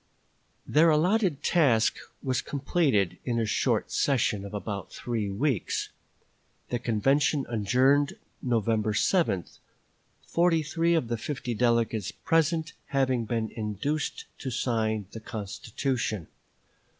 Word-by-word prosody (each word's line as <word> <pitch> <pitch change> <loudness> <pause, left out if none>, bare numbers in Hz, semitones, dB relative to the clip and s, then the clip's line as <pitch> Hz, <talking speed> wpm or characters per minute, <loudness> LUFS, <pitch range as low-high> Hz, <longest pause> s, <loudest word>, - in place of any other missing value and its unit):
" - - -42
Their 165 +2 +7
allotted 175 +1 +2
task 130 -10 +3 0.3
was 130 -2 0
completed 135 - 0
in 120 -2 -1
a 115 - +1
short 105 - 0
session 115 -7 +1
of 100 - -7
about 105 -1 -5
three 115 -4 -3
weeks; 115 - -1 0.8
the 120 - -1
convention 135 +5 +2
adjourned 130 +6 +3 0.3
November 110 -3 +1
7, 110 - +2 0.8
forty 170 -2 +2
three 165 +3 +1
of 155 -8 +1
the 120 0 -1
fifty 125 0 -3
delegates 115 -3 +1
present 165 +3 +1
having 130 -4 +1
been 110 0 -2
induced 110 +8 -3
to 135 - -4
sign 110 -4 0
the 115 - -7
constitution. 110 - -3
120 Hz, 115 wpm, -28 LUFS, 110-145 Hz, 0.8 s, Their